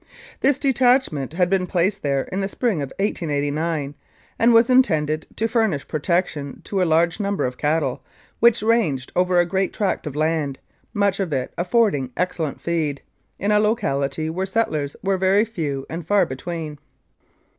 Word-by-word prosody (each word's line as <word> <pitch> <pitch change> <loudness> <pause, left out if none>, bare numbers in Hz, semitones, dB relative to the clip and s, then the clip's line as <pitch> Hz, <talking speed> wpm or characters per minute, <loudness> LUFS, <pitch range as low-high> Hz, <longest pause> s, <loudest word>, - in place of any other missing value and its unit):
This 275 0 +3
detachment 250 - +2
had 180 +1 +2
been 185 0 +1
placed 190 +3 0
there 140 -2 0
in 190 - -2
the 195 - -1
spring 205 - -1
of 140 - -5
1889, 150 -5 -1 0.5
an 230 - +4
d - - +7
was 230 0 +6
intended 160 - +2
to 225 - 0
furnish 220 - 0
protection 155 -2 -1
to 195 -2 -2
a - - +3
large 170 +4 +2
number 200 -1 -1
of 125 0 -4
cattle, 150 -3 0 0.4
which 235 -2 +4
ranged 210 - +1
over 180 0 +3
a 175 - +4
great 190 +2 -1
tract 195 -6 -1
of 145 - -5
land, 155 -3 0 0.3
much 200 -1 +1
of 190 -5 -2
it 130 -3 -2
affording 175 - +1
excellent 170 -5 -2
feed, 155 -5 -2 0.3
in 200 +2 0
a 210 - +4
locality 155 - 0
where 185 +4 -2
settlers 155 -9 -1
were 195 -1 +1
very 195 +3 +3
few 145 -11 -4
and 165 0 -6
far 205 -2 +4
between. 155 +2 -6
175 Hz, 165 wpm, -22 LUFS, 150-205 Hz, 0.5 s, d